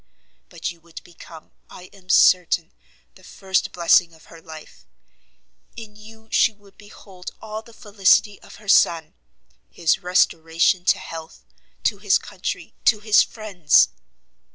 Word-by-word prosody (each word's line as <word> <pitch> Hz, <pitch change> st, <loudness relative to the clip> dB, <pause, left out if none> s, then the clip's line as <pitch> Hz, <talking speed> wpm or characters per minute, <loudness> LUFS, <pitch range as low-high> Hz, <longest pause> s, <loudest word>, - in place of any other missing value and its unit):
But -, -, -5 dB
you 170 Hz, -1 st, -18 dB
would 165 Hz, 0 st, -13 dB
become, 165 Hz, -2 st, -15 dB, 0.2 s
I 180 Hz, -, -14 dB
am 190 Hz, -2 st, -20 dB
certain, 180 Hz, -, +3 dB, 0.4 s
the -, -, -21 dB
first 190 Hz, -1 st, -3 dB
blessing 170 Hz, -1 st, +2 dB
of 160 Hz, -, -21 dB
her 165 Hz, -, -14 dB
life; 160 Hz, -1 st, -14 dB, 0.9 s
in 220 Hz, -3 st, -11 dB
you 220 Hz, +1 st, -16 dB
she -, -, +3 dB
would 200 Hz, -1 st, -23 dB
behold 195 Hz, -3 st, -13 dB
all 215 Hz, 0 st, -7 dB
the 230 Hz, -, -18 dB
felicity 205 Hz, -1 st, +1 dB
of -, -, -15 dB
her 210 Hz, 0 st, -17 dB
son, 170 Hz, -5 st, +2 dB, 0.6 s
his 170 Hz, +2 st, 0 dB
restoration 175 Hz, -1 st, +1 dB
to 200 Hz, -, +3 dB
health, 165 Hz, -3 st, -11 dB, 0.4 s
to -, -, -1 dB
his -, -, +2 dB
country, -, -, -7 dB
to 220 Hz, -, +4 dB
his 215 Hz, 0 st, +4 dB
friends!" 195 Hz, -8 st, +2 dB
185 Hz, 140 wpm, -21 LUFS, 170-210 Hz, 0.9 s, to